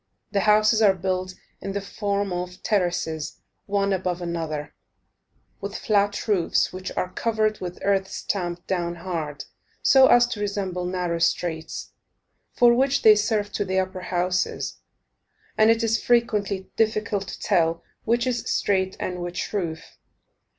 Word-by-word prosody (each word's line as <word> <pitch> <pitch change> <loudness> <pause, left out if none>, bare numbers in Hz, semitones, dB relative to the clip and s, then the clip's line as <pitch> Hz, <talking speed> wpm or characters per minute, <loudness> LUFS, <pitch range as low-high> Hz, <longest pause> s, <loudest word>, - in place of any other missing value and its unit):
The 200 - +1
houses 215 +2 +4
are 200 -3 +5
built 185 0 -2 0.3
in 195 - -4
the 200 - -1
form 200 -1 -2
of 180 +1 -5
terraces, 175 -6 -1 0.3
one 200 -1 +1
above 185 -1 -1
another, 160 -4 -4 0.9
with 200 +1 -5
flat 205 0 +1
roofs, 190 -5 +2
which 185 0 -5
are 180 - -1
covered 215 -2 0
with 180 -1 -6
earth, 195 -1 +2
stamped 175 -3 -3
down 175 -2 -1
hard, 165 -4 -5 0.4
so 265 -1 +7
as 245 0 +6
to 225 - -4
resemble 195 -3 -2
narrow 180 -2 -1
streets, 165 -1 -1 0.6
for 240 -1 +5
which 270 +3 +2
they 215 - +9
serve 210 -1 0
to 205 - -1
the 190 -1 -2
upper 185 0 -1
houses, 180 0 -1 0.8
and 215 +1 +5
it 230 +1 +3
is 225 0 +1
frequently 210 -5 +1
difficult 215 -3 0
to - - -7
tell 165 0 +1 0.2
which 235 +2 +1
is 245 -2 -2
street 190 -1 +1
and 180 -1 -3
which 175 +3 -4
roof. 165 -5 -4
190 Hz, 145 wpm, -24 LUFS, 180-210 Hz, 0.9 s, they